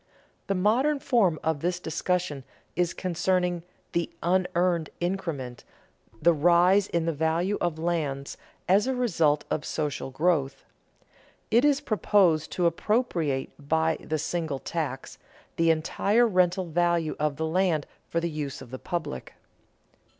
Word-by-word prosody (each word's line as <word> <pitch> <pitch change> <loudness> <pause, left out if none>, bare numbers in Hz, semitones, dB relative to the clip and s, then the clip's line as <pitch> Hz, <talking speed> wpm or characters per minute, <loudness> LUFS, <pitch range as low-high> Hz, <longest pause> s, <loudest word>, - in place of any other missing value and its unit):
The 195 - 0
modern 245 +10 +2
form 220 - +2
of 160 -2 0
this 175 +3 -1
discussion 160 -3 -2 0.3
is 175 -1 +1
concerning 180 0 0 0.3
"the 170 -1 -1
unearned 180 -2 +1
increment," 165 -9 -3 0.6
the 170 +6 +5
rise 175 +5 +4
in 170 -1 -1
the 165 - 0
value 160 +6 0
of 170 -2 0
lands 155 -5 -2 0.3
as 200 +7 +4
a 265 - 0
result 165 -12 +1
of 155 - -1
social 150 -3 -3
growth. 145 -1 0 0.9
It 235 +3 +5
is 290 -1 +3
proposed 195 - +2
to 180 - 0
appropriate 170 - 0
by 160 +2 +1
"the 155 - -2
single 160 -2 -2
tax" 130 - -4 0.4
the 165 0 +2
entire 200 +8 +2
rental 185 -2 +2
value 170 -1 +1
of 150 -1 0
the 160 +3 -2
land 165 -2 +1 0.2
for 170 - 0
the 170 - -1
use 150 -2 -4
of 130 -2 -12
the 130 - -6
public. 165 - -5
170 Hz, 135 wpm, -27 LUFS, 155-185 Hz, 0.9 s, the